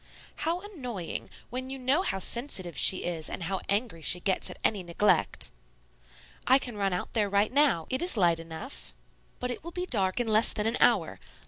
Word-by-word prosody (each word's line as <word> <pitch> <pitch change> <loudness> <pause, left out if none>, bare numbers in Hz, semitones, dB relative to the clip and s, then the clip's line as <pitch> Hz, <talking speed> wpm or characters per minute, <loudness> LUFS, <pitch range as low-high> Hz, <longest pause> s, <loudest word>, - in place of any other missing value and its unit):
"How 340 +2 -2
annoying! 250 - -6 0.2
When 255 +1 -4
you 270 - -5
know 265 +6 +1
how 195 - -2
sensitive 190 - 0
she 185 - +6
is 165 -3 -3
and - - -5
how 190 +3 -3
angry 200 -4 0
she 175 +3 +5
gets 190 +1 0
at - - -9
any 205 -3 +1
neglect." 175 +4 0 1.0
"I 260 - +7
can 245 -4 -5
run 200 -1 -1
out 180 - -4
there 210 -3 +1
now. 205 - +2
It 260 - +1
is 350 -8 +3
light 170 -4 +3
enough." 165 - -8 0.4
"But 250 0 -3
it 245 - -7
will 340 - -6
be 360 +1 -4
dark 195 - 0
in 240 - -1
less 220 +1 +5
than 210 - -2
an 225 +2 0
hour. 200 -9 +2
215 Hz, 195 wpm, -28 LUFS, 185-260 Hz, 1.0 s, I